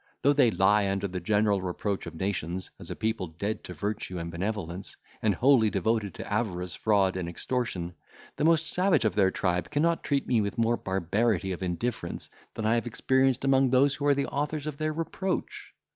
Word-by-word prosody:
Though 140 +2 +5
they 135 -4 +5
lie 100 0 +3
under 100 +1 -1
the 90 -1 -4
general 105 +1 +2
reproach 95 +2 -3
of - - -8
nations, 90 -1 -3
as - - -9
a - - -4
people 110 -4 -1
dead 100 +7 -4
to 90 - -7
virtue 100 +1 -3
and 85 0 -4
benevolence, 95 0 -4 0.2
and 105 -3 +2
wholly 125 -1 +5
devoted 105 +1 0
to - - -6
avarice, 90 -5 -1
fraud, 100 -4 +2
and 90 -2 -3
extortion, 90 -3 -3 0.4
the - - -2
most 165 0 +4
savage 180 - +2
of 110 - +2
their 100 -2 +4
tribe 90 -2 -1
cannot 165 +3 +1
treat 140 -2 0
me 120 -3 +2
with 100 -1 -3
more 115 0 +3
barbarity 95 +1 0
of 90 - -5
indifference, 90 0 -3 0.2
than 110 - -3
I 110 - +3
have 120 0 0
experienced 130 +2 +1
among 135 -1 +4
those 135 +2 +4
who 145 0 -2
are 145 - +5
the 140 - 0
authors 150 +1 -2
of 150 -2 -4
their 155 0 0
reproach." 165 +4 -3
110 Hz, 195 wpm, -28 LUFS, 95-130 Hz, 0.4 s, Though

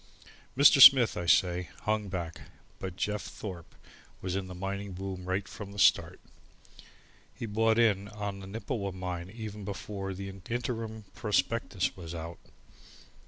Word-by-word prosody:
Mr. 140 0 +7
Smith, 130 -4 +9
I 85 - -4
say, 90 0 +3
hung 110 -1 -1
back. 85 -3 -5 0.4
But 95 -2 -5
Jeff 105 +2 -2
Thorpe 90 -5 -8 0.4
was 95 0 -3
in 95 -1 -3
the 90 - -8
mining 100 +1 -4
boom 95 0 -6
right 95 +1 -2
from 100 -1 -9
the - - -11
start. 90 -2 +3 1.2
He - - -5
bought 110 +1 +2
in 105 -4 +3
on 100 -1 -5
the 95 - -9
Nippewa 100 -1 -4
mine 90 -1 -5
even 105 -1 -7
before 100 -1 -5
the 100 +1 -6
interim 110 +2 -5
prospectus 100 -2 0
was 85 -2 -8
out. 85 +1 -7
100 Hz, 145 wpm, -30 LUFS, 90-105 Hz, 1.2 s, Smith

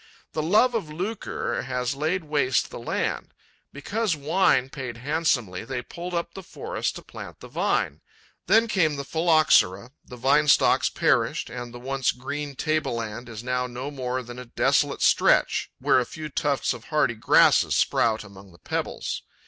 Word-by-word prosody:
The 155 - -2
love 210 +10 +3
of 215 -9 -2
lucre 190 +8 -3
has 125 0 -2
laid 160 +6 -1
waste 145 -4 0
the - - -7
land. 120 - -3 0.4
Because 205 +6 -1
wine 150 -3 +2
paid 130 -5 -6
handsomely, 125 - -1
they 125 +1 -4
pulled 175 +6 -7
up 170 0 -3
the 195 - -8
forest 185 - -4
to - - -9
plant - - -10
the - - -11
vine. - - -1 0.5
Then 225 +1 +5
came 165 -8 +2
the 140 - -4
Phylloxera, 155 - +3
the 125 - -11
vine 140 +5 +3
stocks - - +4
perished - - +1
and 120 -1 -6
the 120 - -9
once 135 +1 0
green 140 +3 -5
table 155 -4 -1
land 115 +1 -5
is 110 0 -8
now 125 0 -1
no 125 +4 -6
more 130 -2 -3
than 120 +1 -9
a 125 - -8
desolate 120 - +1
stretch - - +3
where - - +3
a 125 - -1
few 155 -1 -7
tufts 140 -2 0
of 120 -2 -11
hardy 150 -6 +1
grasses 110 - +4
sprout 110 -2 +2
among 100 -2 -14
the 85 - -18
pebbles. - - -4
135 Hz, 170 wpm, -25 LUFS, 120-155 Hz, 0.5 s, Then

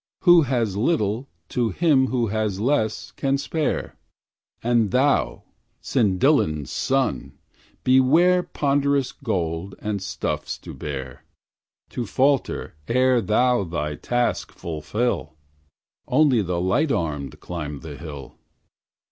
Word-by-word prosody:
Who 175 -2 +7
has 120 -8 0
little, 115 0 0 0.2
to 120 -2 0
him 135 - +3
who 125 -3 0
has 105 -2 -1
less, 110 -2 0
can 135 0 0
spare, 150 +2 -2 0.7
And 115 -3 +2
thou, 125 - +1 0.4
Cyndyllan's 95 - +1
son! 130 - -1 0.5
beware 155 +8 +5
Ponderous 140 -4 0
gold 95 - -3
and 105 -2 -3
stuffs 95 - -3
to - - -10
bear, 65 -4 -6 0.7
To 120 -3 -4
falter 135 +4 +1
ere 125 0 +3
thou 120 +3 +2
thy 75 -4 -3
task 120 +10 -1
fulfil, 80 - -3 0.7
Only 130 -3 +4
the 90 -3 -2
light 135 - +1
armed 75 - -2
climb 75 -5 -6
the 80 -3 -8
hill. 70 -4 -9
115 Hz, 110 wpm, -23 LUFS, 85-135 Hz, 0.7 s, Who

